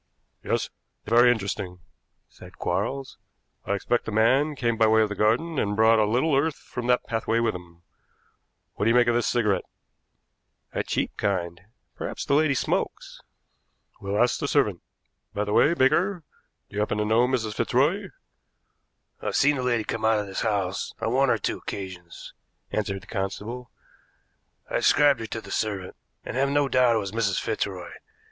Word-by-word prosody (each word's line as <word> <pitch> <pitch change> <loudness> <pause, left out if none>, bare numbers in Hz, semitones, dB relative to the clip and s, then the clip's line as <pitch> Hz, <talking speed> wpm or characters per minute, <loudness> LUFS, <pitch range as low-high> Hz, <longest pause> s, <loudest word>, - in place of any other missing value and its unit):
"Yes, - - -1 0.3
very 120 +2 +5
interesting," 100 -4 -3 0.5
said - - -15
Quarles. 135 -1 -3 0.5
"I 100 - 0
expect 120 +4 -1
the - - -4
man 130 +8 +3
came 120 -3 0
by 110 0 +4
way 110 0 +5
of 105 - -1
the - - -3
garden 130 +10 +1
and 105 0 0
brought 110 +1 +5
a 105 - +4
little 130 +7 +2
earth 145 +2 +1
from 120 -1 -7
that 125 0 +2
pathway 115 0 0
with 115 -1 +1
him. 85 -1 -11 0.9
What 100 - -2
do - - +4
you 115 - +3
make 125 0 +5
of 120 - +2
this 120 -1 +1
cigarette?" 105 -6 +1 1.1
"A - - -2
cheap - - -2
kind. 85 -5 -2 0.3
Perhaps - - -5
the - - 0
lady 145 -1 +3
smokes." - - -2 0.8
"We'll 100 +1 -2
ask 120 0 +2
the 145 - -2
servant. 105 - +1 0.5
By 105 - 0
the 105 - -2
way, 155 +9 +4
Baker, 170 +6 +2 0.4
do - - -14
you - - -1
happen 105 0 0
to 105 - 0
know 115 +3 +3
Mrs. 115 -4 -1
Fitzroy?" 145 - +1 1.1
"I've - - -3
seen 145 0 +3
a - - -1
lady 120 -3 +1
come 110 +1 -4
out 110 0 +4
of 105 - -2
this 95 -1 -4
house 100 -4 -1
on 115 - -1
one 135 +1 +3
or - - +3
two - - -3
occasions," 90 -3 -8 0.4
answered 100 -2 -2
the - - -14
constable. 110 +4 -5 1.0
"I - - -1
described 145 -4 +4
her 110 - -5
to 110 +1 -5
the - - -11
servant, 100 -4 -2 0.3
and - - -6
have 135 +2 +2
no 145 0 +2
doubt 125 -3 +3
it - - +3
was 100 -3 -3
Mrs. 110 -4 0
Fitzroy. 95 -5 -3
115 Hz, 180 wpm, -25 LUFS, 105-130 Hz, 1.1 s, very